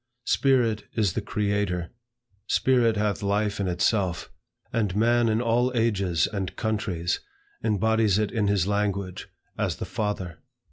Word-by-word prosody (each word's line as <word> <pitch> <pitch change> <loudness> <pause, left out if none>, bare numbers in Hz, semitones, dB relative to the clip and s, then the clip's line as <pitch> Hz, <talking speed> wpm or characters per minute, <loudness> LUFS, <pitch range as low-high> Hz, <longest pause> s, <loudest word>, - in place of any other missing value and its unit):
Spirit 120 -6 +2
is 105 -6 +1
the 110 - -1
Creator. 100 -4 -1 0.6
Spirit 120 -4 +3
hath 105 0 0
life 105 +1 0
in 100 - 0
itself. 90 0 0 0.4
And 105 -5 0
man 120 +2 +3
in 110 +2 +1
all 120 +2 +2
ages 100 -8 +2
and 95 -4 -4
countries, 105 -6 -1 0.4
embodies 110 -1 +2
it 105 -1 0
in 110 -4 0
his 100 -3 +2
language, 100 -2 -2 0.3
as - - 0
the - - -5
FATHER. 95 -6 -3
105 Hz, 135 wpm, -26 LUFS, 95-110 Hz, 0.6 s, Spirit